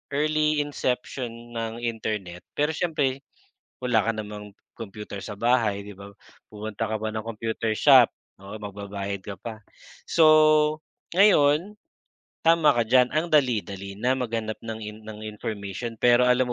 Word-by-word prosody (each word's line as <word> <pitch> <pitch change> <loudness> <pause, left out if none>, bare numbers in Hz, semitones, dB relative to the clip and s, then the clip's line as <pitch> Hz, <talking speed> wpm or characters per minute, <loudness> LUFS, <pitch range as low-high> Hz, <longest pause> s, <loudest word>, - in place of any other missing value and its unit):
early 155 0 +2
inception 125 -4 -4
ng 115 0 -5
Internet. 105 -6 -4
Pero 150 +2 +1
siyempre 150 -5 -1 0.6
wala 125 -3 +2
ka 110 - -1
namang 105 -2 -8 0.2
computer 105 -2 -8
sa 105 +1 -7
bahay 115 -4 +1
'di 105 - -9
ba, 100 +1 -11 0.4
pupunta 110 +1 -5
ka 110 - -1
pa 110 +1 -3
ng 110 - -3
computer 115 0 -3
shop, 130 -5 +7 0.3
oo, 100 +2 -8
magbabayad 100 -1 -6
ka 100 0 -8
pa. 110 +2 -8 0.5
So 165 - +5 0.9
ngayon 180 0 +4 0.7
tama 165 -2 +5
ka 120 - +2
diyan 125 +2 +4
ang 155 +5 0
dali-dali 100 -8 0
na 125 +4 +1
maghanap 115 -4 -3
ng 110 -1 -5
in 105 -1 -8
ng 110 0 -9
information 105 +1 -5
pero 125 +2 +4
alam 125 +1 +4
115 Hz, 140 wpm, -25 LUFS, 105-130 Hz, 0.9 s, shop